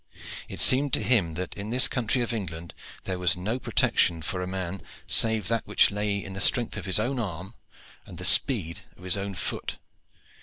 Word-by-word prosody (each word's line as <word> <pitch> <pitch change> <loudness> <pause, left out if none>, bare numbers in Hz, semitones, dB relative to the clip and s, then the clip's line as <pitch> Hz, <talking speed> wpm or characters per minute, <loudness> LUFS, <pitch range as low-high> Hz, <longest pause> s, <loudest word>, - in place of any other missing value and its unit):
It - - -6
seemed 135 +1 +4
to - - +1
him 100 -8 +1
that 90 +1 -5
in 100 +2 -7
this 125 +2 +4
country 125 -1 -1
of 120 - -3
England 85 -6 -6 0.3
there 95 -1 -4
was 90 -1 +2
no 110 +8 -3
protection 85 -8 +1
for 90 +2 -4
a 90 - -4
man 95 0 -5 0.2
save 110 -2 +4
that 115 -1 -1
which - - +3
lay 105 0 -1
in 95 - -8
the 95 - -4
strength 120 +3 +1
of - - -6
his 95 -3 +1
own 130 +1 -2
arm 95 -1 -5 0.5
and - - -11
the - - -2
speed 95 - +3 0.2
of - - -17
his 95 0 +1
own 100 -1 -5
foot. - - -4
100 Hz, 200 wpm, -26 LUFS, 90-115 Hz, 0.5 s, seemed